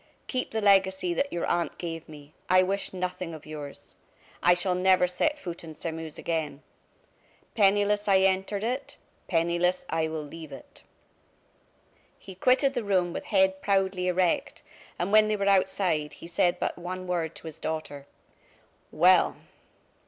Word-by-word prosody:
"Keep 255 -1 -2
the 220 - -2
legacy 190 -3 +3
that 280 +10 -1
your 170 - -2
aunt 175 -1 -1
gave 165 -2 -6
me, 150 -1 -13 0.2
I 185 0 +6
wish 195 +2 -1
nothing 180 -2 -4
of 155 - -12
yours. 150 -2 -9 0.5
I 175 - +5
shall 180 +1 +1
never 185 0 +4
set 290 +13 0
foot 175 -11 -7
in 160 -1 -9
Sairmeuse 160 -1 -6
again. 155 -3 -3 0.9
Penniless 205 0 +2
I 190 -1 +5
entered 195 +2 +1
it, 250 +4 -3 0.3
penniless 170 +1 +1
I 160 -1 +1
will 160 -1 -4
leave 155 +1 -10
it!" 135 - -12 1.4
He 190 - -11
quitted 255 +8 +3
the 245 -3 -2
room 185 -4 +1
with - - -5
head 190 -2 +2
proudly 190 -2 +1
erect, 180 -1 0 0.3
and 180 +3 -2
when 215 0 +6
they 215 - +1
were 200 - -1
outside, 185 -5 +1
he - - -12
said 175 +1 +1
but - - -2
one 185 +1 -5
word 170 -3 -2
to - - -12
his 160 -2 -7
daughter: 145 -3 -5 0.8
"Well!" 180 +3 +4
180 Hz, 155 wpm, -27 LUFS, 165-195 Hz, 1.4 s, I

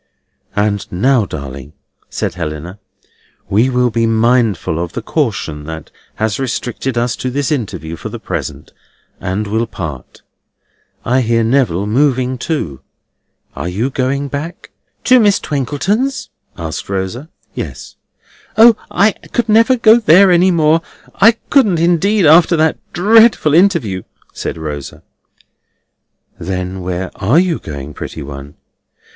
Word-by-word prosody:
"And 105 -1 -1
now, 120 +5 +2
darling," 70 -1 -8 0.4
said - - -3
Helena, 85 +3 -6 0.7
"we 110 +6 +3
will 125 -1 +1
be 115 0 +1
mindful 110 -7 +1
of 85 - -7
the - - -4
caution 100 - -2
that 80 -1 -8 0.2
has 110 +1 -1
restricted 130 0 -3
us 120 -1 0
to 130 - -3
this 140 +2 -2
interview 100 - -3
for - - -7
the - - -6
present, - - -6 0.5
and 95 +3 -2
will 110 +3 -1
part. 75 - -8 0.8
I 130 +2 +2
hear 115 -1 +1
Neville 110 -6 +1
moving 130 +2 +1
too. 85 - -3 0.7
Are - - -4
you 110 +9 -2
going 135 +2 -1
back?" 145 +5 -6 0.3
"To 255 -1 +5
Miss 205 -3 +3
Twinkleton's?" 180 - -2 0.3
asked 80 0 -5
Rosa. 100 - -4 0.2
"Yes." - - -7 0.6
"O, 230 +1 +8
I 200 +4 +3
could 235 +1 -4
never 230 +4 +4
go 225 -1 +6
there 195 -2 +6
any 180 +2 +4
more. 160 -2 +3 0.3
I 225 +3 +5 0.2
couldn't 215 -11 +4
indeed, 175 +4 +2
after 165 +2 +6
that 160 0 +1
dreadful 215 -4 +4
interview!" 160 - +2 0.3
said - - -5
Rosa. 75 -3 -7 1.4
"Then 90 +1 -4
where 90 +1 -4
are 115 +11 +2
you 175 -2 +2
going, 70 -1 -8
pretty - - -7
one?" 70 0 -9
125 Hz, 130 wpm, -15 LUFS, -, 1.4 s, O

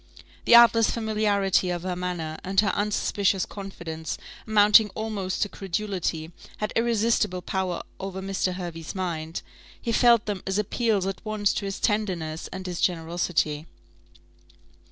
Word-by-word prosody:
The 235 - +7
artless 230 -1 +7
familiarity 210 -4 +1
of 175 -1 -3
her 185 -1 -2
manner, 175 -3 -4
and 190 +1 +1
her 200 - +1
unsuspicious 205 -2 +1
confidence, 170 -5 -6 0.3
amounting 210 0 +6
almost 205 -4 -2
to - - -1
credulity, 185 -5 -3 0.3
had 210 - -3
irresistible 230 -5 +1
power 185 -2 -2 0.2
over 190 0 -5
Mr. 190 -1 -1
Hervey's 170 -3 -6
mind; 165 -3 -3 0.4
he 235 - -2
felt 235 -1 +5
them 205 -3 -3
as 195 +1 0
appeals 210 -1 +1
at 195 -1 -4
once 215 -2 0
to 200 - -3
his 195 -1 -4
tenderness 180 -7 -1
and 190 0 -6
his 180 -2 -4
generosity. 165 -3 0
195 Hz, 135 wpm, -26 LUFS, 175-210 Hz, 0.4 s, The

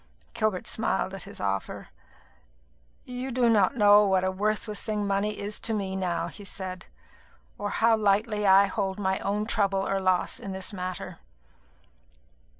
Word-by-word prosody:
Gilbert 215 -4 -1
smiled 190 -3 -1
at 195 - -7
this 200 - -8
offer. 100 -1 -3 1.2
"You 250 +1 -5
do 250 -1 +2
not 220 +2 +3
know 205 -1 +7
what 190 -1 +2
a 185 - +1
worthless 210 +2 -2
thing 210 -1 -2
money 200 +1 0
is 205 +1 -4
to 225 - -1
me 195 -2 -3
now," 180 -3 -1
he 205 - -10
said, 185 -1 -6 0.7
"or 205 0 -3
now 230 0 +6
lightly 210 0 +1
I 195 +1 +7
hold 190 0 -2
my 190 -2 0
own 210 +2 -1
trouble 200 -3 0
or 195 - 0
loss 185 -1 +1
in 195 - -6
this 190 +2 -3
matter." 185 -2 -5
200 Hz, 155 wpm, -27 LUFS, 190-210 Hz, 1.2 s, know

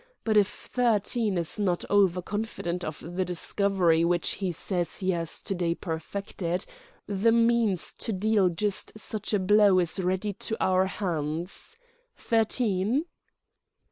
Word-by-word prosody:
But 220 -1 +1
if 205 -2 +5 0.2
Thirteen 225 -3 +1
is 170 +4 -2
not 180 -4 0
over 190 -3 +3
confident 190 -4 -3
of 155 -2 -5
the 175 +3 -3
discovery 180 -1 +1
which 175 0 +1
he 190 -2 0
says 175 +1 -2
he 190 -1 0
has 165 -2 -2
to - - -3
day 175 -2 0
perfected, 175 +1 -4 0.4
the 205 +3 +2
means 230 -5 +2
to 225 - 0
deal 205 -1 +2
just 200 +4 -2
such 215 -1 -3
a 210 - +3
blow 200 0 +5
is 180 +1 +1
ready 190 +3 -1
to 220 +3 -3
our 185 0 +2
hands.... 175 - -4 0.4
Thirteen?" 225 - +1
190 Hz, 140 wpm, -27 LUFS, 175-210 Hz, 0.4 s, if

